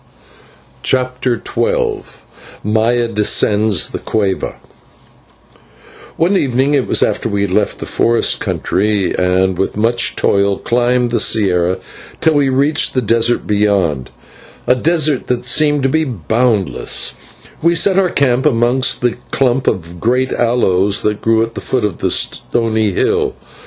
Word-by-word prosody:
CHAPTER 125 -2 -1
XII 465 -4 -1 0.6
MAYA 115 +2 +1
DESCENDS 105 -1 +1
THE - - -5
CUEVA 100 -3 -2 1.6
One 175 +5 +2
evening 135 -3 +1
it 135 -3 +1
was - - +2
after - - -1
we 100 -1 -1
had 100 - -2
left 100 +2 0
the - - -7
forest 115 0 +1
country, 100 -1 -1
and 90 0 0
with 95 - -2
much 120 +2 +1
toil 100 0 +1
climbed 120 0 0
the 120 - 0
/sierra/ 95 -4 +1 0.4
till 160 - +2
we 145 -2 +2
reached 140 +4 +1
the 130 - +2
desert 115 +2 +1
beyond, 100 -10 0 0.6
a - - +4
desert 155 +1 0
that 125 -1 -2
seemed 145 +2 +2
to 135 - +2
be 160 +4 +1
boundless 115 - 0 0.5
we 170 +1 +2
set 190 +3 +3
our 185 -2 +2
camp 135 -2 +1
amongst 125 0 +1
a 120 -1 0
clump 130 0 0
of 85 -3 -2
great 125 +5 0
aloes 105 -5 +1
that 105 -1 -1
grew 115 0 +2
at 115 0 -5
the - - -7
foot 125 -4 -1
of 100 -5 -5
a - - +2
stony 110 -2 0
hill. 95 - 0
120 Hz, 140 wpm, -15 LUFS, 105-130 Hz, 1.6 s, a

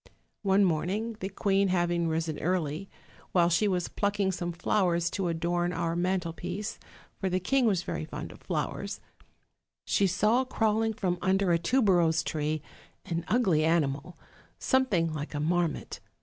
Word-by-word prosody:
One 195 0 +4
morn 170 -1 0
ing, 220 +4 -2
the 190 - -3
queen 195 0 +1
having 175 -2 +1
risen 160 -1 -1
early, 175 +1 -1 0.4
while 175 -2 +4
she 175 +5 +3
was 180 -3 0
plucking 200 -1 0
some 175 -1 -3
flowers 175 -1 +1
to 195 -3 -1
adorn 175 +1 0
our 170 -1 -1
mantelpiece, 180 +3 -2 0.4
for 190 - 0
the 185 0 +1
king 255 +7 +2
was 190 -5 +1
very 75 - -3
fond - - -7
of - - -15
flowers, - - -3 0.9
she 200 - +2
saw 210 +7 +2
crawling 225 -3 +1
from 180 -4 -1
under 190 -1 +2
a 170 - +3
tuberose 175 -6 +3
tree 155 0 -2 0.4
an 170 -1 -2
ugly 190 -10 +3
animal, 160 0 0 0.4
something 205 - +1
like 150 0 -5
a - - -1
marmot. 165 +1 -1
180 Hz, 150 wpm, -29 LUFS, 165-200 Hz, 0.9 s, One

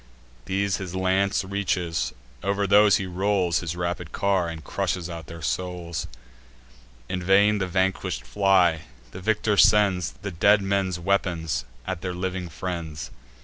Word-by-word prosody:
These 100 0 0
his 95 -2 -6
lance 95 +2 +1
reaches; 90 -4 -1 0.3
over 100 +1 0
those 100 +1 +6
he 95 - -1
rolls 95 -1 +1
His 85 -1 -4
rapid 85 -1 -3
car, 95 -4 +1
and 80 -2 -7
crushes 90 +4 -2
out 80 -2 -7
their 85 -1 -9
souls: 85 +5 -3 1.0
In 90 +6 -3
vain 100 +3 +4
the 95 - -1
vanquish'd 95 -9 -1
fly; 90 -1 +3 0.3
the 90 - -8
victor 105 +1 +1
sends 95 -7 +4
The 100 - -3
dead 100 +4 +4
men's 95 -2 0
weapons 85 -5 0 0.2
at 95 -2 -4
their 90 -1 -3
living 90 -1 -3
friends. 80 -5 -5
95 Hz, 145 wpm, -25 LUFS, 85-100 Hz, 1.0 s, those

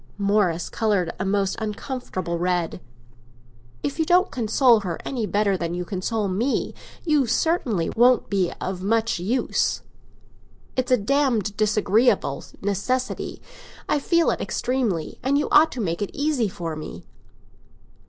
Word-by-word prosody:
'" - - -32
Morris 180 -6 +2
coloured 200 -6 0
a 190 - -1
most 195 0 +1
uncomfortable 210 -5 -4
red. 175 -1 -1 1.0
"If 280 - -3
you 320 - +2
don't 360 +3 +3
console 240 0 +4
her 180 -5 -4
any 235 -5 -2
better 205 -1 +1
than 170 -1 -3
you 180 0 -3
console 205 +3 -2
me, 220 +9 -1 0.3
you 300 -6 +3
certainly 235 - 0
won't 245 +1 +4
be 190 -3 0
of 185 -1 -4
much 225 0 +1
use! 220 +9 0 0.9
It's 255 0 -1
a 250 - +6
damned 225 -3 +1
disagreeable 215 +2 +2 0.2
necessity; 225 +6 -2 0.4
I 295 - +2
feel 335 +3 +2
it - - -3
extremely, 235 -11 -2
and 270 +3 +2
you 295 - 0
ought 315 +1 +6
to 255 - -6
make 170 -3 -2
it 205 - -1
easy 285 -6 +1
for 170 -4 -5
me." 155 - -8
215 Hz, 145 wpm, -24 LUFS, 185-255 Hz, 1.0 s, a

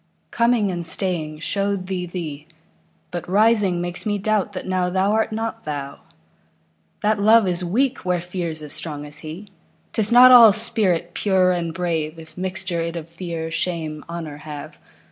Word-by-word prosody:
Coming 235 -4 +2
and 175 -1 -4
staying 160 -3 -2
show'd 200 +1 -1
thee 185 -1 -3
thee; 155 -4 -6 0.6
But 175 0 -5
rising 205 -2 +3
makes 175 +1 -3
me 205 -2 -1
doubt 205 0 0
that 185 - -6
nowThou 185 +1 0
art 220 +1 +1
not 225 +1 -4
thou. 140 -2 -5 1.0
That 210 0 +1
Love 215 0 +5
is 180 0 -1
weak 245 +9 0
where 180 -1 -1
Fear's 170 -3 -5
as 150 - -4
strong 150 -2 -5
as 150 +1 -5
he;'Tis 190 +5 -5
not 250 +1 +9
all 230 -4 +9
spirit 195 -6 0
pure 190 -2 +2
and 170 -2 -1
brave, 165 -2 -2
If 160 0 -13
mixture 185 -1 -3
it 165 0 -3
of 165 -1 -6
Fear, 165 -1 -5
Shame, 165 -3 -3
Honour 165 -4 -6
have. 150 -1 -9
180 Hz, 160 wpm, -22 LUFS, 165-205 Hz, 1.0 s, not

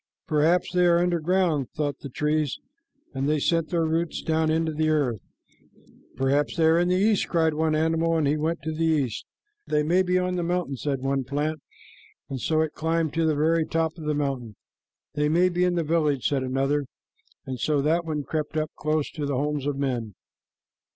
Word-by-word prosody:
"Perhaps 165 +2 +2
they 180 0 +4
are 170 0 +5
under 175 0 +1
ground," 165 -5 +1
thought 145 -2 -2
the 140 - -8
trees, 150 +1 0 0.6
and 135 +1 -1
they 155 - +2
sent 165 +2 +1
their 170 -2 +1
roots 165 +1 -1
down 160 0 +1
into 160 0 +1
the 155 +1 +1
earth. 140 -8 +1 1.0
"Perhaps 140 +2 +1
they 165 - +3
are 160 +1 +5
in 175 - +2
the 180 - +2
east," 205 +2 +2
cried 160 -2 +2
one 155 0 +1
animal, 165 +1 +1
and 155 - +1
he 145 - +2
went 160 +1 -2
to 160 - -2
the 160 +1 -2
east. 145 -8 0 0.4
"They 150 0 +1
may 175 +5 +3
be 180 0 +1
on 180 0 0
the 175 - -1
mountain," 175 -4 -1
said 135 0 -2
one 135 0 0
plant, 145 +4 -2 0.7
and 130 -2 -4
so 155 +4 +1
it 160 -1 -1
climbed 160 -1 -1
to 165 0 +1
the 155 - +2
very 160 +2 +2
top 160 0 -1
of 160 -3 -9
the 150 0 0
mountain. 135 -7 -3 0.6
"They 150 0 +1
may 175 +4 +4
be 180 0 0
in 180 -1 +2
the 170 - +1
village," 150 -4 +1
said 140 -2 0
another, 135 +2 0 0.6
and 130 -2 -5
so 150 +4 +1
that 165 +3 +2
one 155 -3 -3
crept 155 +1 -3
up 155 0 -1
close 155 -1 -1
to 150 -3 -4
the 140 -2 -1
homes 145 0 -1
of 145 -1 -1
men. 120 -7 -2
155 Hz, 205 wpm, -25 LUFS, 145-165 Hz, 1.0 s, are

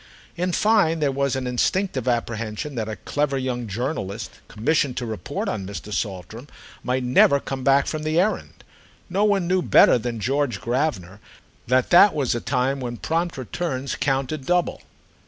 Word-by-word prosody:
In 180 +1 -1
fine 200 -5 +3
there 145 -2 +1
was 140 0 0
an 130 -1 -3
instinctive 130 - 0
apprehension 115 +2 -2
that 110 -3 -3
a 110 - -4
clever 145 +5 -1
young 125 -3 -3
journalist 110 -1 -4 0.2
commissioned 130 +3 0
to 125 - -2
report 110 +5 -4
on 100 -4 -3
Mr. 100 +1 -7
Saltram 105 +6 -4 0.3
might 130 +1 -1
never 125 +3 +5
come 135 -1 -5
back 135 +1 +4
from 155 - -3
the 155 +2 +1
errand. 210 +4 -1 0.5
No 195 +3 +1
one 200 -4 +2
knew 185 +1 +2
better 125 - +5
than 115 0 -4
George 135 -1 0
Gravener 115 - -2 0.5
that 125 +1 +2
that 180 +1 +7
was 140 -5 +1
a 120 - -3
time 135 +1 0
when 120 -2 -5
prompt 165 +4 -2
returns 130 0 -3
counted 135 +1 -1
double. 180 -1 +1
130 Hz, 165 wpm, -23 LUFS, 120-155 Hz, 0.5 s, that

